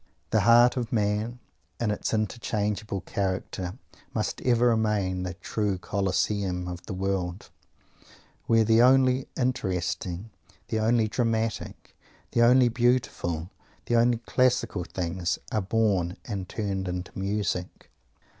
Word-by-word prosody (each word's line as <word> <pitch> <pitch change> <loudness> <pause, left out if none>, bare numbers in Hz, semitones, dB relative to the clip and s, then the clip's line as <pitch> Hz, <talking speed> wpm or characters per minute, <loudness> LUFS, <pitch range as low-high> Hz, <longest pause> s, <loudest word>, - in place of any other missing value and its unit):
The 110 - +4
heart 120 +4 +6
of 120 -2 -2
man, 105 +2 0 0.4
in 115 -3 +1
its 105 - -2
unchangeable 105 -2 -2
character, 95 0 -3 0.4
must 110 - -2
ever 120 -1 +3
remain 105 -5 +1
the 90 -1 -4
true 105 0 -2
Coliseum 95 -1 -1
of 90 0 -6
the 105 - -4
world, 95 -1 -3 1.0
where 115 -1 +5
the 110 +1 +4
only 130 +1 +4
interesting, 95 -4 -2 0.4
the 110 - 0
only 110 0 +3
dramatic, 115 -1 -2 0.4
the 120 - +2
only 125 +1 +6
beautiful, 120 -9 0 0.3
the 120 - +1
only 120 0 +4
classical 125 -6 +1
things 90 -1 -2
are 110 - +1
born 95 -4 +1
and 95 -5 -5
turned 100 -3 -2
into 90 0 -4
music. 95 -2 -3
105 Hz, 120 wpm, -27 LUFS, 95-115 Hz, 1.0 s, heart